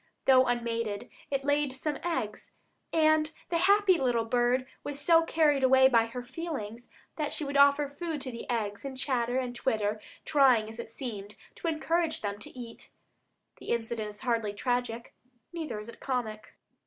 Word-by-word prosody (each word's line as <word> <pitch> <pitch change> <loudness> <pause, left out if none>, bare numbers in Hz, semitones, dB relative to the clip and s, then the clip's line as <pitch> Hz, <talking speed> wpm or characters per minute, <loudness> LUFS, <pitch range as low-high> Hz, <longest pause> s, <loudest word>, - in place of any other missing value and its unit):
Though 260 -1 +6
unmated, 230 -3 -2 0.2
it 275 -1 -1
laid 285 -1 +1
some 290 +2 -3
eggs, 325 -12 -3 0.4
and 310 -1 +3 0.2
the 335 - +1
happy 390 -1 +5
bird 245 0 +1 0.2
was 285 -1 -4
so 330 +2 +5
carried 305 -4 +2
away 265 0 +7
by 230 -3 +4
her 245 +2 -6
feelings 245 -5 -6 0.3
that 300 -2 -1
she - - -1
would 280 0 -4
offer 280 +1 +5
food 305 +2 -4
to 260 - -4
the 235 +1 -8
eggs, 210 -4 -2
and 270 -1 -6
chatter 245 -2 0
and 250 -2 -2
twitter, 215 -4 0 0.2
trying, 260 -7 +4
as 225 +1 -11
it 235 - -6
seemed, 210 -5 -6 0.2
to - - -6
encourage 325 +1 0
them 205 -1 -3
to 210 - -9
eat! 230 -1 -8 0.7
The - - -10
incident 225 -2 -2
is 210 0 -9
hardly 230 -5 0
tragic, 245 +1 -2 0.4
neither 310 -10 -4
is 210 - -9
it 235 - -11
comic. 220 -5 -4
255 Hz, 165 wpm, -29 LUFS, 230-290 Hz, 0.7 s, away